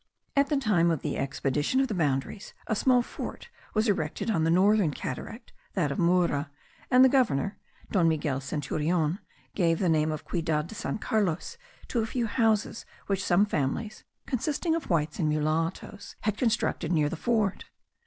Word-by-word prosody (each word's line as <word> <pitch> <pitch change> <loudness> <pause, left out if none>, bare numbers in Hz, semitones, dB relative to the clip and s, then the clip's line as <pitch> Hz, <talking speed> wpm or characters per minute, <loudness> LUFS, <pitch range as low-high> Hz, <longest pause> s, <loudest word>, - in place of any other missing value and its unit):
At 280 0 +3
the 295 - +2
time 200 -10 +3
of 160 -4 -1
the - - -2
expedition 145 - 0
of 270 - +2
the 225 - -3
boundaries, 150 +2 -2
a 220 - -1
small 250 +3 +3
fort 475 - -7 0.3
was 215 +2 +2
erected 190 +2 -1
on 165 -7 +1
the - - +2
northern 195 +1 +4
cataract, 225 - -6 0.2
that 160 -7 +1
of - - -3
Mura; 170 -4 +2 0.4
and 255 0 +7
the - - +8
governor, 215 - +1 0.3
Don 175 -5 +3
Manuel 145 -4 -1
Centurion, 155 +4 -1 0.3
gave 165 -4 +2
the 185 - 0
name 155 -1 +2
of 155 - -5
Ciudad 160 -3 0
de 175 - -10
San 220 - -3
Carlos 210 - -1 0.3
to 240 - -1
a 220 - 0
few 240 +1 -1
houses 220 -1 +1 0.2
which 195 -1 -1
some 195 +2 +4
families, 205 +6 -2 0.2
consisting 300 +6 -1
of 330 -2 -3
whites 155 -2 0
and 155 -3 +1
mulattos, 160 +6 -2
had 210 -1 0
constructed 215 -7 0
near 155 -4 +3
the 165 - -3
fort. 210 +1 0
180 Hz, 175 wpm, -28 LUFS, 155-220 Hz, 0.4 s, the